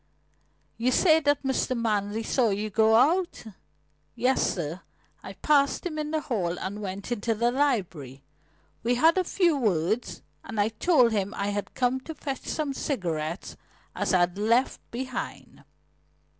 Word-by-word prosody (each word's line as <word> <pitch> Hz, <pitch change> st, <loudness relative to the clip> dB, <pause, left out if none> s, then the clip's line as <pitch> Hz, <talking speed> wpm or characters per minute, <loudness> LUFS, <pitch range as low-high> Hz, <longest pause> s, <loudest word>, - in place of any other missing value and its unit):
"You 245 Hz, +2 st, +2 dB
say 320 Hz, +3 st, +5 dB
that 290 Hz, -2 st, +1 dB
Mr. 265 Hz, -1 st, 0 dB
Manley 210 Hz, -1 st, -1 dB
saw 240 Hz, 0 st, +2 dB
you 210 Hz, +2 st, -2 dB
go 220 Hz, +2 st, +4 dB
out?" 340 Hz, +9 st, +2 dB, 0.7 s
"Yes, 260 Hz, +2 st, +1 dB
sir. 170 Hz, 0 st, -4 dB, 0.4 s
I -, -, -9 dB
passed 285 Hz, +1 st, +2 dB
him 310 Hz, -3 st, -3 dB
in 300 Hz, 0 st, -3 dB
the 310 Hz, 0 st, -1 dB
hall 190 Hz, -, -2 dB
and 205 Hz, +2 st, -5 dB
went 195 Hz, +3 st, -6 dB
into 225 Hz, 0 st, -1 dB
the 235 Hz, +2 st, +1 dB
library. 180 Hz, -, -1 dB, 0.6 s
We 240 Hz, +2 st, +1 dB
had 325 Hz, +8 st, +4 dB
a -, -, +2 dB
few 350 Hz, -2 st, +2 dB
words, 200 Hz, -, -1 dB, 0.2 s
and 225 Hz, -, -6 dB
I 205 Hz, +1 st, +3 dB
told 245 Hz, +1 st, +3 dB
him 205 Hz, -1 st, -1 dB
I 200 Hz, +1 st, -2 dB
had 205 Hz, 0 st, -4 dB
come 255 Hz, +1 st, +1 dB
to 320 Hz, +4 st, -9 dB
fetch 275 Hz, -3 st, -5 dB
some 300 Hz, -3 st, -2 dB
cigarettes 170 Hz, -, -3 dB, 0.4 s
as -, -, -1 dB
I'd 180 Hz, 0 st, +2 dB
left 230 Hz, +5 st, +2 dB
behind." 255 Hz, +1 st, -6 dB
230 Hz, 155 wpm, -27 LUFS, 200-275 Hz, 0.7 s, say